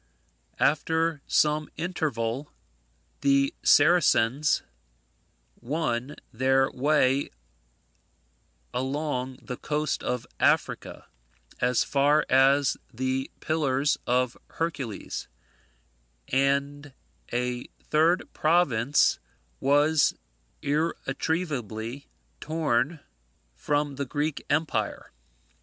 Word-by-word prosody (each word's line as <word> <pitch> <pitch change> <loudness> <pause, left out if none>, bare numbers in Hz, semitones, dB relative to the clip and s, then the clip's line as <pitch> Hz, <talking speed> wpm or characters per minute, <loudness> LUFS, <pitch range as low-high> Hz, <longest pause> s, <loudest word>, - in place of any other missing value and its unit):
After 160 +1 +1
some 150 0 +2
interval, 145 -6 -2 0.7
the 140 0 +3
Saracens 150 -3 +4 1.0
won 130 0 -2 0.2
their 135 +3 +2
way 140 0 +2 1.4
along 130 0 -2
the 125 - -6
coast 150 0 -2
of 125 -2 -2
Africa, - - 0 0.5
as 125 -1 +2
far 145 +2 +3
as 135 +1 +4
the 130 +2 -2
Pillars 145 -3 +1
of 125 0 +1 0.2
Hercules, 140 - -4 1.0
and 140 +1 0 0.4
a 125 0 -2 0.2
third 160 +4 +3
province 150 -5 +3 0.4
was 145 +2 +3 0.5
irretrievably 140 - -2 0.3
torn 150 -1 0 0.5
from 145 - -1
the 140 - -2
Greek 145 +2 -2
empire. 155 +2 -1
140 Hz, 75 wpm, -27 LUFS, 130-155 Hz, 1.4 s, Saracens